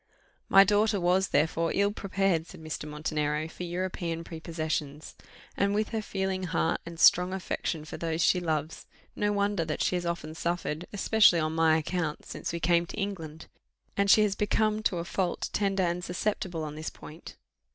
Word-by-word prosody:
"My 195 0 +8
daughter 210 +1 +2
was, 185 +2 +2
therefore, 165 +3 +1
ill 200 +1 +2
prepared," 195 -5 0
said 185 - -12
Mr. 155 -1 -6
Montenero, 150 0 -2
"for 165 - -11
European 175 -1 -3
prepossessions; 155 -3 -4 0.4
and 200 +1 +1
with 215 0 0
her 225 -1 -2
feeling 190 -2 -2
heart 165 -1 0
and 170 -1 -8
strong 180 +3 +6
affection 170 -4 -3
for 155 - -7
those 165 -1 -2
she 180 +2 +4
loves, 155 -2 -3 0.3
no 205 0 +1
wonder 200 -3 +1
that 155 -1 -2
she - - +1
has 175 -1 -2
often 165 -2 -3
suffered, 170 -1 -3
especially 205 -3 +4
on 155 0 -1
my 160 -1 +4
account, 160 -1 -3
since - - -5
we 170 - -3
came 170 +1 +2
to - - -8
England; 165 -6 -5 0.5
and 200 0 +1
she 215 - +7
has 205 -2 +1
become, 215 +1 +1
to 190 -4 0
a 170 - -3
fault, 180 -1 -2
tender 195 -2 +1
and 175 0 -1
susceptible 180 -3 -2
on 150 -1 -5
this 155 +1 -5
point." 160 +3 -12
175 Hz, 180 wpm, -28 LUFS, 160-195 Hz, 0.5 s, My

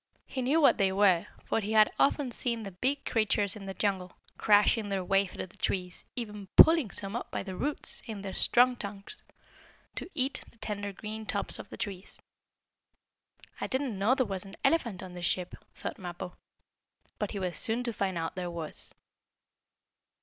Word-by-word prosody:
He 260 - -4
knew 275 +6 +3
what 285 - +5
they 195 -1 +3
were, 190 -3 +4 0.2
for - - +1
he 215 0 -2
had 215 -1 +6
often 280 -2 +3
seen 235 -1 -2
the 195 - -6
big 265 +10 -1
creatures 210 -3 +1
in 200 -2 -8
the 195 - -5
jungle, 190 -3 -1 0.2
crashing 210 +1 +4
their 195 -2 -1
way 195 +2 +3
through - - -6
the 180 - -19
trees, 180 -2 -2
even 210 -4 -5
pulling 320 -8 +8
some 195 +3 -4
up 240 - -4
by - - -3
the 190 -1 -6
roots, 290 +9 -1
in 210 -3 -6
their 195 -1 -5
strong 250 +1 +4
trunks, 205 - -6 0.7
to - - -6
eat 265 +1 +1
the - - -23
tender 205 -2 -4
green 215 +2 -7
tops - - +1
of - - -9
the - - -8
trees. 195 -2 -5 1.4
"I - - -2
didn't 260 -6 -1
know 220 +7 +4
there 260 -2 +2
was 195 -3 -3
an 195 -1 -11
elephant 235 - +2
on 185 -1 -8
this 175 -1 -4
ship," 180 0 -1 0.2
thought - - -5
Mappo. 180 0 -6 0.8
But - - -1
he 205 - -5
was 180 -2 -2
soon 230 +2 +1
to 235 -2 -1
find 190 -4 -1
out 165 0 -2
there 180 -1 -3
was. 165 -3 -7
205 Hz, 185 wpm, -30 LUFS, 190-235 Hz, 1.4 s, pulling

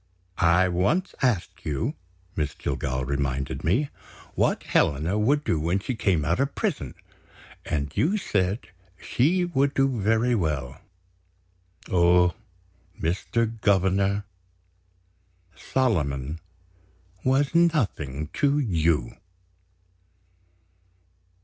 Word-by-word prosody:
"I 85 +2 +4
once 100 - 0
asked 120 -9 0
you," 80 - -2 0.4
Miss 75 -3 -2
Jillgall 65 -1 -2
reminded 70 -1 -2
me, 125 - +1 0.4
"what - - +1
Helena 80 +9 +1
would 145 +7 +2
do 85 - 0
when 85 +5 +1
she 100 +6 -3
came 95 -9 +1
out 75 - +1
of 135 +1 0
prison, - - -2 0.7
and 70 -1 -2
you 190 +8 +2
said 100 - -1 0.3
she 175 +8 +1
would 140 -4 0
do 135 -4 +1
very 115 +4 +2
well. 75 - -2 1.1
Oh, 90 0 +4 0.7
Mr. 110 +6 -1
Governor, 100 0 +2 1.3
Solomon 80 - -1 0.8
was 135 +3 +2
nothing 100 - +1
to 145 0 +2
You!" 85 - +1
95 Hz, 95 wpm, -25 LUFS, 80-130 Hz, 1.3 s, I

